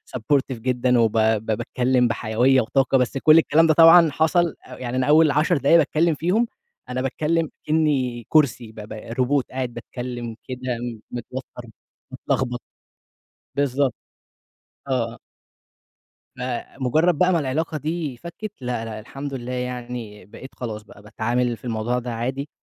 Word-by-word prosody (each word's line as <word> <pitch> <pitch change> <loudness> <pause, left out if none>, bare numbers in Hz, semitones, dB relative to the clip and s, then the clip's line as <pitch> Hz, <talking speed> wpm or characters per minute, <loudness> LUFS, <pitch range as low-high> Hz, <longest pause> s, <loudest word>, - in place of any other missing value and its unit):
supportive 130 +1 0
جدًا، 125 0 +1
وب 115 -2 +3
ب 110 0 +2
باتكلّم 125 +3 +1
بحيوية 120 +3 +2
وطاقة. 135 +3 +2
بس 125 +2 0
كل 155 +4 +6
الكلام 165 0 +4
ده 160 - +5
طبعًا 165 +1 +8
حصل 165 +2 +2
أ 125 - -11
يعني 125 0 -4
أنا 130 - +1
أوّل 155 0 +6
10 155 +3 +2
دقايق 140 +4 +5
باتكلّم 160 +1 +2
فيهم 185 +10 +1 0.4
أنا 125 0 -2
باتكلّم 155 +4 0 0.2
كأني 140 -7 0
كرسي 125 -7 +2
ب - - -23
ب 105 - -9
روبوت 125 +5 -1
قاعد 130 -2 -3
باتكلّم 120 -2 -6
كده 130 -1 -5 0.5
متوتر، 125 0 -7 0.5
متلخبط. 120 -2 -2 0.9
بالضبط. 140 -2 +1 0.9
آه، 120 -3 -1
آه. - - -15 1.2
فمجرد 130 +6 0
بقى 185 0 +3
ما 170 - +3
العلاقة 155 +3 -2
دي 155 -3 -3
فكت. 175 - -8
لا، 120 -2 -3
لا 110 -1 -6
الحمد 135 +5 -7
لله 125 -1 -5
يعني 125 -5 -5
بقيت 130 +7 -11
خلاص 110 -3 -6
بقى 100 -1 -16
باتعامل 120 +3 -1
في 105 - -16
الموضوع 120 +1 -1
ده 120 -1 -5
عادي، 130 +5 -3
130 Hz, 145 wpm, -23 LUFS, 120-150 Hz, 1.2 s, طبعًا